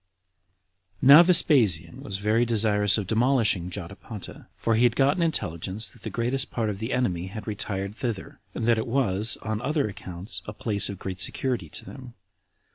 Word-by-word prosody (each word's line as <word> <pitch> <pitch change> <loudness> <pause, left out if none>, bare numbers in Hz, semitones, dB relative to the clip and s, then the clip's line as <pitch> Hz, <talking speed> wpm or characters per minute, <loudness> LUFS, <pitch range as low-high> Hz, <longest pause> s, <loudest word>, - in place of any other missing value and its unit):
3. - - +1
Now 150 +4 +11
Vespasian 145 - +2
was 95 - -4
very 105 +4 +1
desirous 105 -3 +3
of 105 - -2
demolishing 110 -4 +1
Jotapata, 100 +3 -9
for 115 - -1
he 115 +2 +2
had 120 -1 +3
gotten 140 +5 +2
intelligence 105 - -2
that - - -19
the 110 - -5
greatest 125 +6 -1
part 110 -3 -2
of 100 - -7
the 110 +4 -4
enemy 95 -8 -1
had 100 +1 -8
retired 100 -1 -4
thither, 115 -5 -5 0.2
and 115 - -3
that 115 -1 +3
it 110 - -4
was, 115 -4 +3
on 110 0 -3
other 145 -1 0
accounts, 95 0 -7
a 105 - -6
place 105 -2 -1
of 100 - -6
great 95 0 -6
security 120 - -1
to - - -5
them. 125 -3 -11
110 Hz, 180 wpm, -25 LUFS, 100-125 Hz, 0.2 s, Now